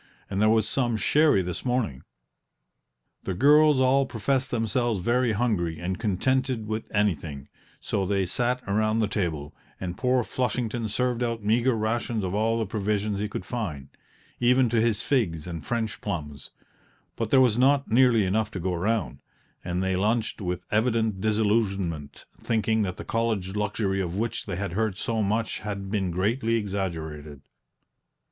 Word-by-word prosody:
And 100 +1 0
there 110 - +5
was 110 -1 +3
some 120 -4 0
sherry 145 -4 +3
this 90 -1 -5
morning." 120 - -1 1.2
The 95 - -3
girls 150 - +5
all 130 +1 +3
professed 130 +3 -1
themselves 115 -1 0
very 120 +4 +1
hungry 100 -8 0
and 90 +2 -3
contented 125 +3 0
with 110 +1 -4
anything; 80 -9 -1 0.3
so 95 -2 -2
they 100 -1 +1
sat 125 +6 -1
around 110 +2 +1
the 110 -2 +2
table, 80 -8 -2 0.3
and 90 -2 -4
poor 125 +4 +1
Flushington 120 -2 -2
served 125 +2 0
out 115 -2 -2
meagre 115 +4 +2
rations 110 0 -1
of 90 0 -2
all 110 +2 +1
the 115 - 0
provisions 105 0 -1
he 105 0 -2
could 95 - -5
find, 80 - -4 0.5
even 125 0 +4
to 115 -1 +2
his 115 -1 +1
figs 90 - 0
and 85 -2 -7
French 115 -4 -2
plums; 75 -4 -5 0.7
but 115 -2 -2
there 135 - +5
was 125 -5 +4
not 140 0 +3
nearly 120 -2 +5
enough 105 +3 0
to 95 - -6
go 90 +1 -1
round, 90 - -1 0.4
and 90 +1 -2
they 95 0 0
lunched 110 +4 0
with 90 -1 -3
evident 110 -2 +1
disillusionment, 100 -8 0 0.2
thinking 110 -1 +1
that 90 -3 -2
the - - -7
college 110 -5 -1
luxury 105 -2 -1
of 90 -1 -3
which 115 +1 -2
they 95 - -3
had 95 -1 -3
heard 110 -1 -1
so 115 -1 -1
much 110 +2 -1
had 100 -2 -5
been 100 -4 0
greatly 110 +7 0
exaggerated. 80 -9 -4
110 Hz, 160 wpm, -26 LUFS, 95-120 Hz, 1.2 s, there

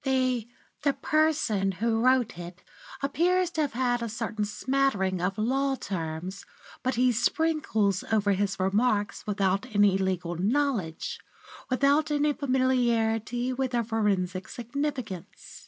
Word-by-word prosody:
The 255 -4 +1 0.3
the 285 -2 +2
person 290 -13 +1
who 225 +4 0
wrote 255 -2 +3
it 175 +1 -9 0.4
appears 355 +5 +2
to 320 - -1
have 290 -3 -1
had 245 -1 0
a 230 - -3
certain 220 -1 -2
smattering 210 -5 0
of 190 +3 -1
law 270 +5 +1
terms, 180 -2 -5 0.4
which 255 0 -1
he 250 +1 +4
sprinkles 240 - +1
over 210 -2 +3
his 195 0 0
remarks 205 +2 0
without 200 +2 0
any 200 -2 +4
legal 180 -2 -1
knowledge, 205 - -1 0.5
without 280 +4 +3
any 295 0 +2
familiarity 245 -3 +1
with 260 0 -2
their 235 -1 +2
forensic 195 -5 -1
significance. 240 - -5
230 Hz, 125 wpm, -27 LUFS, 195-265 Hz, 0.5 s, he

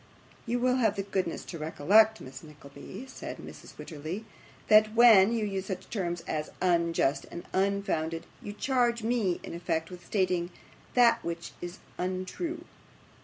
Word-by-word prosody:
'You 240 +2 +1
will 250 +1 +2
have 220 -5 +2
the 195 - -2
goodness 190 -3 -2
to 170 - -7
recollect, 205 +8 +4
Miss 135 +1 -9
Nickleby,' 150 - -11
said 265 - -7
Mrs - - -11
Wititterly, 165 +7 -6 0.4
'that 215 0 +6
when 225 -4 +8
you 230 -2 0
use 195 -2 -3
such 190 -1 -6
terms 175 -5 -2
as 155 -2 -3
"unjust", 170 -6 +1
and 175 - -7
"unfounded", 190 -4 0 0.2
you 205 - -6
charge 240 +1 +1
me, 220 -6 +1
in - - -7
effect, 165 -1 -2
with 180 -1 -10
stating 180 -3 0 0.5
that 240 -2 +5
which 170 0 -5
is 175 +1 -6 0.2
untrue. 185 - -3
190 Hz, 150 wpm, -29 LUFS, 170-220 Hz, 0.5 s, when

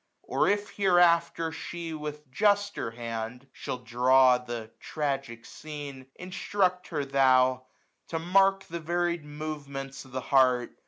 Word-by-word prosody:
Or - - +1
if 205 0 0
hereafter 170 -4 +3
she, 170 0 -6
with 150 -2 -7
juster 205 - +1
hand, 115 +2 -6
Shall - - -5
draw 125 +1 +4
the 120 -3 -7
tragic 135 -6 -3
scene, 145 -4 -8
instruct 180 0 -1
her 150 -4 -2
thod, 130 -2 +4
io6a - - -28 0.5
To 165 - -3
mark 195 +3 +3
the 170 +1 -6
varied 170 0 -1
movements 145 -2 -6
of 130 - -17
the 130 0 -3
heart. 125 -2 +3
150 Hz, 130 wpm, -28 LUFS, 130-175 Hz, 0.5 s, draw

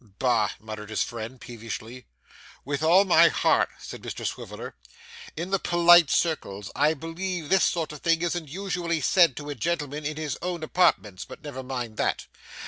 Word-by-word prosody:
'Bah!' 115 -5 +2
muttered 110 0 -8
his 110 - 0
friend, 120 +1 -7
peevishly. 115 +1 -8 0.6
'With 140 +1 -2
all 175 +5 +5
my 170 -2 +6
heart,' - - +2
said - - -9
Mr - - -6
Swiveller. - - -6 0.6
'In 180 +3 -4
the 195 - +2
polite 175 -2 +6
circles 105 - -1
I 150 +3 +3
believe 165 +2 -5
this 190 -1 +4
sort 165 -3 -1
of 150 - -9
thing 165 +2 +1
isn't 175 -2 -2
usually 175 0 -2
said 165 -1 +4
to 145 0 -5
a - - -2
gentleman 150 -2 -3
in 150 +1 -3
his 155 -4 -4
own 175 -2 -3
apartments, 105 - +1
but - - -12
never 140 -3 -6
mind 125 -4 -5
that. - - -1
150 Hz, 170 wpm, -26 LUFS, 125-170 Hz, 0.6 s, my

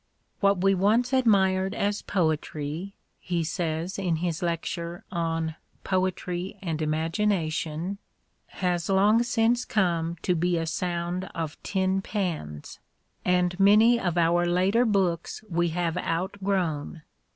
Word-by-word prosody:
What 200 -2 +3
we 195 +1 +4
once 220 +7 +2
admired 195 -6 +3
as 205 +1 0
foetry 160 0 -2 0.3
[he 175 -2 -1
says 165 +2 -2
in 180 -4 0
his 170 0 -2
'lecture 170 0 -3
on 165 -2 -1 0.2
" - - -38
Poetry 185 0 -1
and 165 -5 -3
Imagination 165 +2 -1 0.3
"] - - -46 0.2
has 175 -1 0
long 205 +4 +4
since 240 0 +2
come 170 -6 0
to 180 - +2
be 175 +1 +1
a 165 - -1
sound 175 +2 -2
of 160 -3 -4
tin 190 0 0
pans; 165 - -4 0.4
and 180 0 +1
many 215 +4 +6
of 175 -4 -1
our 170 +1 +3
later 190 +7 +3
books 190 -4 0
we 175 -2 +1
have 170 0 -1
outgrown. 175 -4 -2
180 Hz, 130 wpm, -26 LUFS, 165-195 Hz, 0.4 s, many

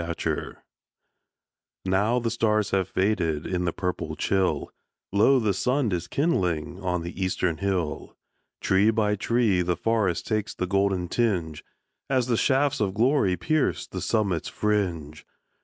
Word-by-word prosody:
At 85 0 -5
Sunrise - - -2 1.3
Now 100 +6 +2
the 115 -2 -1
stars 110 -2 +1
have 95 -2 +1
faded 90 -6 0
In 90 -1 -1
the 85 - +1
purple 85 -4 -3
chill, 95 +4 0 0.4
Lo, 105 +7 +4
the 110 -4 +1
sun 125 +4 0
is 90 -1 -2
kindling 90 - -1
On 90 -2 -1
the 85 +3 -5
eastern 90 -2 0
hill. 90 -4 -3 0.4
Tree 95 +3 +3
by 105 -2 +1
tree 105 -3 +1
the 90 -1 -1
forest 110 -5 0
Takes 110 0 -2
the 95 - -2
golden 95 -1 0
tinge, 85 -8 -1 0.5
As 130 -3 +2
the 120 -1 +1
shafts 135 +4 +2
of 100 -2 -1
glory 115 -5 +2
Pierce 155 -3 0
the - - -6
summit's 100 -7 0
fringe. 85 -8 -2
100 Hz, 145 wpm, -25 LUFS, 90-115 Hz, 1.3 s, Lo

